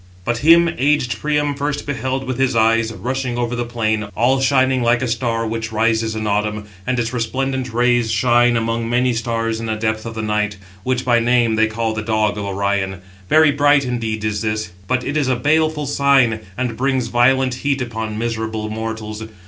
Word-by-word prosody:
But 120 0 -1
him 170 +4 +6
aged 135 -4 +1
Priam 150 -1 0
first 145 +1 -3
beheld 130 -2 -2
with 130 -1 -4
his 135 -2 +1
eyes, 115 0 +3
rushing 125 +1 -3
over 120 0 -1
the 120 - -1
plain, 110 -3 -1
all 125 +5 +2
shining 130 -1 +2
like 120 +1 +2
a - - 0
star 115 -1 -1
which 110 0 -4
rises 110 0 +1
in 110 0 -3
autumn; 105 0 -1 0.2
and 125 0 0
its 120 0 -1
resplendent 130 +2 -2
rays 120 0 +2
shine 120 +2 +3
among 115 0 -1
many 125 +1 +2
stars 115 -1 -2
in 115 - -5
the 110 - -1
depth 110 +1 -2
of 115 - -7
the 110 - -3
night, 105 -1 -1 0.2
which 130 +4 -1
by 120 -2 +4
name 120 -1 +2
they 110 0 +3
call 110 0 -2
the 110 - -3
dog 110 -1 0
of 100 - -4
Orion. 100 -1 -2 0.3
Very 155 -1 +5
bright 145 -1 +3
indeed 115 -3 -3
is 105 -1 -1
this, 110 -3 -2 0.2
but 125 +3 0
it 145 - -3
is 150 -3 +1
a 130 - +2
baleful 155 +3 +1
sign, 135 -5 +3 0.2
and 125 -2 -2
brings 130 -2 0
violent 130 +2 +3
heat 140 -1 0
upon 110 -3 -4
miserable 110 -1 -3
mortals. 110 -1 -5
120 Hz, 195 wpm, -19 LUFS, 110-130 Hz, 0.3 s, him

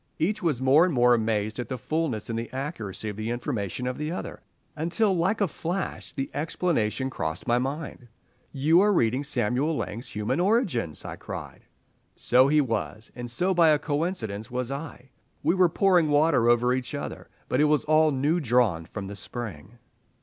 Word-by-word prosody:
Each 195 +8 0
was 160 -9 0
more 140 +5 +6
and 180 - +2
more 125 0 +5
amazed 110 -1 0
at 125 - -4
the 130 - -3
fulness 150 -5 -2
and 115 -1 -2
the 115 - -6
accuracy 130 - -5
of 105 - -7
the 110 +1 -3
information 120 - -3
of 125 +1 -3
the 150 +1 -2
other, 180 - -6 0.3
until 175 +6 +1
like 190 +6 +1
a 200 - +3
flash 175 +4 -4
the 135 -1 -4
explanation 135 - -1
crossed 80 -7 -4
my 120 +1 +2
mind. 135 -1 -4 0.4
"You 155 +6 +4
are 210 +1 +4
reading 125 - +2
Samuel 140 +3 0
Laing's 115 +4 -5
'Human 105 +8 -2
Origins'!" 175 - 0
I - - -6
cried. - - -8 0.5
So 130 +2 +4
he 150 +1 +4
was, 115 -3 -3
and 120 0 -6
so 180 +11 0
by 170 -2 +5
a 150 - +5
coincidence 145 - -3
was 125 0 -3
I. 140 -2 -7 0.3
We - - +3
were 185 -2 +4
pouring 180 -3 +3
water 145 -5 +4
over 120 +1 +3
each 130 -1 -3
other, - - -6 0.2
but 130 - +1
it - - +5
was 150 0 +2
all 155 +1 +4
new 145 +5 +1
drawn 120 - +2
from 100 -2 -6
the 100 +1 -7
spring. 105 -3 -7
130 Hz, 185 wpm, -26 LUFS, 115-160 Hz, 0.5 s, more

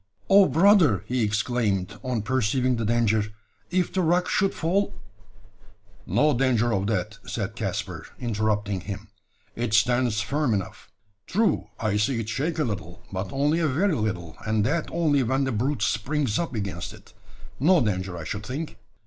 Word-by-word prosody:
"Oh, 195 0 +8
brother!" 160 - +5
he 125 0 -1
exclaimed, 105 -2 0
on 125 -5 -2
perceiving 130 +1 +1
the 115 - -1
danger, 110 -2 +2 0.4
"if 180 0 0
the 190 - +1
rock 180 +2 +2
should 195 0 +2
fall 190 +5 0 0.6
" 100 +2 -30
"No 150 0 +3
danger 120 -2 +2
of 100 0 0
that," 100 -5 -2
said - - -3
Caspar, - - -4
interrupting 105 -4 -1
him; 100 +2 -7 0.5
"it 115 -2 0
stands 120 0 +3
firm 130 +2 0
enough. 95 -2 -5 0.4
True, 205 - +1
I 105 -2 0
see 115 +3 +1
it 110 -1 -4
shake 150 +8 -1
a 155 - +2
little, 100 - -5
but 95 0 -4
only 145 +4 +1
a 165 - +2
very 170 +8 +1
little; 95 - -2
and 110 -1 +1
that 155 +8 0
only 155 -4 +2
when 130 +3 +1
the 130 - 0
brute 125 +1 0
springs 125 +1 0
up 165 -7 -3
against 95 -3 -4
it. 105 -1 -16 0.5
No 175 +6 +5
danger, 95 -6 -1
I 85 - -6
should 100 +6 -4
think!" 145 -3 -5
115 Hz, 165 wpm, -25 LUFS, 105-145 Hz, 0.6 s, Oh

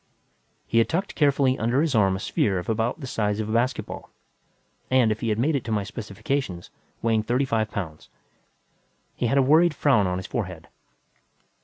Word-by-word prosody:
He 115 - +2
had 115 - +2
tucked 195 +5 -1
carefully 140 -3 +2
under 120 +4 +1
his 155 -2 +1
arm 100 -4 +3
a - - -4
sphere 95 0 0
of 90 - -5
about 115 +7 -1
the - - -5
size 105 -4 -1
of 110 - -2
a - - -4
basketball 120 +3 -1 0.8
and, 130 -4 +4
if 110 - -2
he 115 - -2
had 105 - 0
made 145 +7 +1
it 135 - -1
to 115 - -4
my 105 -2 +1
specifications, 105 -1 -4 0.3
weighing 115 -1 +2
thirty 125 +5 0
five 110 -4 0
pounds. 80 -7 -6 1.1
He 120 - -1
had 135 - +1
a 135 - +5
worried 155 +4 +4
frown 110 -11 +3
on 90 0 -1
his 95 - -5
forehead. 90 -9 -5
115 Hz, 190 wpm, -25 LUFS, 105-135 Hz, 1.1 s, a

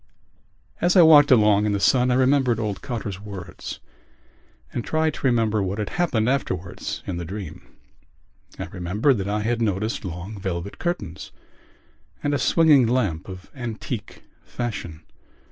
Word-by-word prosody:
As 175 +2 +3
I 180 - +8
walked 150 -3 +8
along 105 -4 +5
in 105 - +1
the 100 - 0
sun 125 +4 +3
I 125 - +3
remembered 130 -2 +3
old 105 -3 -3
Cotter's 110 -6 -5
words 100 -4 -8 0.9
and 120 - -2
tried 155 -1 0
to 135 - -1
remember 110 -4 +2
what 95 +1 -2
had 105 -2 -3
happened 125 -11 0
afterwards 95 -10 -3
in 90 - -4
the 85 - -4
dream. 90 -2 -7 1.0
I - - -4
remembered 100 - 0
that 95 - -3
I 105 +1 0
had 115 +2 -1
noticed 110 +1 -1
long 95 +3 -6
velvet 95 0 -4
curtains 105 - -4 0.9
and 145 - 0
a 145 - +1
swinging 150 -3 +5
lamp 105 -10 -1
of 95 0 -10
antique 120 -4 -6 0.2
fashion. 90 -10 -5
110 Hz, 150 wpm, -23 LUFS, 95-130 Hz, 1.0 s, I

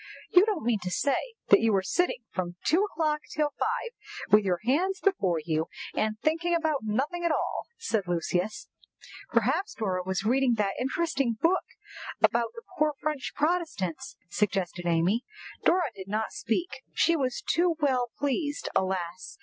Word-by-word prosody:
"You 370 +4 +7
don't 405 - -1
mean 230 -3 +2
to 180 - -3
say 285 - 0
that - - +8
you 225 0 +3
were 195 -2 +2
sitting 255 - 0
from 175 -2 -3
two 350 +5 +4
o'clock 310 -6 0 0.2
till 300 -1 +1
five, 470 - -1 0.4
with 210 +1 +7
your 180 -3 0
hands 365 +10 +2
before 195 - +2
you, 160 -1 0 0.3
and 215 0 0
thinking 335 +2 +2
about 315 -4 +1
nothing 270 +11 -1
at 340 - +2
all," - - -1
said 220 - -1
Lucius. 175 - -1 0.6
"Perhaps 395 +2 +1
Dora 190 -5 -1
was 190 +1 -2
reading 250 +1 +3
that 205 -2 0
interesting 270 -3 0
book 365 +3 +2 0.5
about 235 -1 +3
the 465 - -9 0.2
poor 300 -1 +3
French 300 -3 -3
Protestants," 300 - -1
suggested 180 -2 -1
Amy. 175 +8 +2 0.4
Dora 340 -6 +3
did 190 -2 -9
not 215 +2 -1
speak. 285 +11 -2
She 335 - +4
was 260 -5 -1
too 340 0 +3
well 255 -5 +1
pleased, 285 +1 -1
alas! 185 - -2
250 Hz, 160 wpm, -28 LUFS, -, 0.6 s, that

